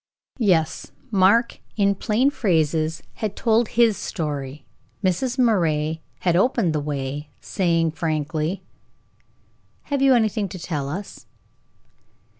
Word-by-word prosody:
Yes, 170 Hz, -8 st, +1 dB, 0.2 s
Mark, 205 Hz, +4 st, +3 dB, 0.2 s
in 200 Hz, -1 st, +3 dB
plain 225 Hz, +7 st, +1 dB
phrases, 160 Hz, -, 0 dB, 0.2 s
had 215 Hz, -2 st, -2 dB
told 230 Hz, 0 st, +2 dB
his 230 Hz, -2 st, +3 dB
story. 145 Hz, -4 st, -4 dB, 0.4 s
Mrs. 240 Hz, +8 st, 0 dB
Moray 160 Hz, -10 st, +1 dB, 0.2 s
had 175 Hz, -2 st, +2 dB
opened 195 Hz, -3 st, +2 dB
the 150 Hz, -, 0 dB
way, 145 Hz, 0 st, -4 dB
saying, 165 Hz, -3 st, 0 dB
frankly: 155 Hz, +2 st, -2 dB, 1.3 s
"Have 280 Hz, -, +1 dB
you 270 Hz, -1 st, +6 dB
anything 215 Hz, -3 st, +1 dB
to 185 Hz, -, -7 dB
tell 150 Hz, -5 st, -3 dB
us?" 190 Hz, +7 st, -7 dB
175 Hz, 110 wpm, -23 LUFS, 155-215 Hz, 1.3 s, you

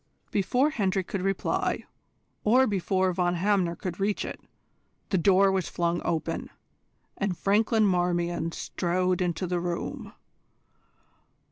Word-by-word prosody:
Before 250 Hz, +9 st, +2 dB
Hendry 195 Hz, -8 st, 0 dB
could 190 Hz, +1 st, -4 dB
reply, 195 Hz, 0 st, -1 dB, 0.6 s
or 250 Hz, +5 st, +5 dB
before 190 Hz, -3 st, +1 dB
Von 175 Hz, 0 st, +1 dB
Hamner 185 Hz, -2 st, +1 dB
could 175 Hz, +1 st, -5 dB
reach 200 Hz, +1 st, 0 dB
it, -, -, -7 dB, 0.7 s
the 190 Hz, -, +2 dB
door 195 Hz, +2 st, +5 dB
was 190 Hz, -2 st, -1 dB
flung 170 Hz, 0 st, -1 dB
open, 160 Hz, -2 st, -2 dB, 0.7 s
and 195 Hz, -3 st, -1 dB
Franklin 215 Hz, +2 st, +3 dB
Marmion 175 Hz, -2 st, 0 dB
strode 180 Hz, +2 st, -1 dB
into 180 Hz, +1 st, -1 dB
the 180 Hz, 0 st, -1 dB
room. 175 Hz, 0 st, -4 dB
185 Hz, 120 wpm, -27 LUFS, 175-200 Hz, 0.7 s, or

